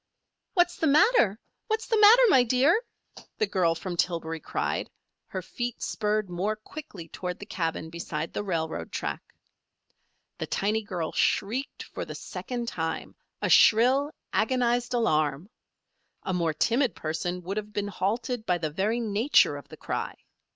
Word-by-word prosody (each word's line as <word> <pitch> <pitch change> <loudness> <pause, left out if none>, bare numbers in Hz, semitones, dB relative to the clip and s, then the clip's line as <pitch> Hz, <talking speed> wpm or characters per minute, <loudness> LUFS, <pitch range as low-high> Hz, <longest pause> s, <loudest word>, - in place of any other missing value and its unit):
"What's 350 -1 +3
the 320 - +1
matter? 295 - +4 0.3
What's 440 0 -1
the 445 - +1
matter, 440 +4 +8
my 265 - +6
dear?" 260 - +3 0.6
the 435 - +2
girl 175 - +1
from 175 +2 -5
Tillbury 165 -2 -1
cried, - - -2 0.4
her - - -5
feet 240 -2 -4
spurred 215 -1 0
more 185 +5 -1
quickly 215 - -10
toward 180 +2 -5
the - - -9
cabin 165 -2 -3
beside 165 -1 -4
the - - -2
railroad 160 - -3
track. - - -3 1.2
The - - -3
tiny 210 +3 0
girl 180 -6 -4
shrieked 245 +8 0
for - - -6
the - - -7
second 240 -2 -5
time 160 -6 -3 0.3
a - - +1
shrill, 260 +6 +5 0.2
agonized 245 +1 +1
alarm. 155 - +1 0.7
A 190 - -2
more 165 -3 0
timid 235 - +2
person 175 +3 -3
would 195 +4 -4
have 210 0 -4
been 205 -1 -2
halted 220 +5 -2
by 180 - +2
the 155 -3 -3
very 205 +8 0
nature 225 +4 +3
of - - -9
the - - -12
cry. - - -3
210 Hz, 150 wpm, -27 LUFS, 170-245 Hz, 1.2 s, matter